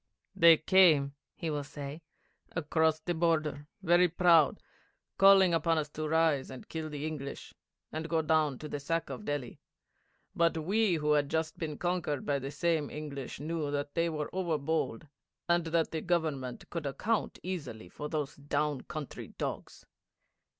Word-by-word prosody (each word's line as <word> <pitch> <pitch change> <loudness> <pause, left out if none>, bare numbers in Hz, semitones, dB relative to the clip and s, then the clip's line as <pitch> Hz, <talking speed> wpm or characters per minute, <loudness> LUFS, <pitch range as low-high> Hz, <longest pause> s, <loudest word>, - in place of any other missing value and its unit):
'They 165 -1 +8
came,' 155 -6 +5 0.2
he 165 -2 -3
will 145 -1 -2
say, 145 +2 -7 0.5
'across 160 -1 +1
the 175 +2 -2
border, 155 -3 0 0.2
very 175 +1 +5
proud, 170 -3 +4 0.6
calling 195 -2 +7
upon 165 0 +2
us 150 -1 -1
to 155 +1 -4
rise 160 -4 +2
and 130 -1 -10
kill 160 -1 -4
the 150 0 -5
English, 145 -3 -6 0.4
and 160 +1 -4
go 165 - +2
down 155 -3 +2
to 150 - -7
the 145 - -4
sack 165 +3 -2
of 210 - -7
Delhi. 145 -4 -4 0.8
But 165 -1 +2
we 195 +4 +2
who 150 -1 0
had 145 -1 +3
just 160 0 -2
been 155 -3 -4
conquered 175 -6 -1
by 140 -1 +1
the 135 +1 -5
same 160 -1 0
English 140 -4 -6
knew 155 0 -2
that 145 0 -3
they 170 0 +1
were 150 -2 -4
over 175 -4 0
bold, 150 -5 -2 0.4
and 175 -1 +2
that 165 0 +1
the 160 - -2
Government 155 -8 -2
could 165 -4 -3
account 210 - -1
easily 150 - -5
for 150 +11 -7
those 145 -2 -3
down 145 -1 -1
country 155 -3 -7
dogs. - - -5
155 Hz, 165 wpm, -31 LUFS, 145-170 Hz, 0.8 s, They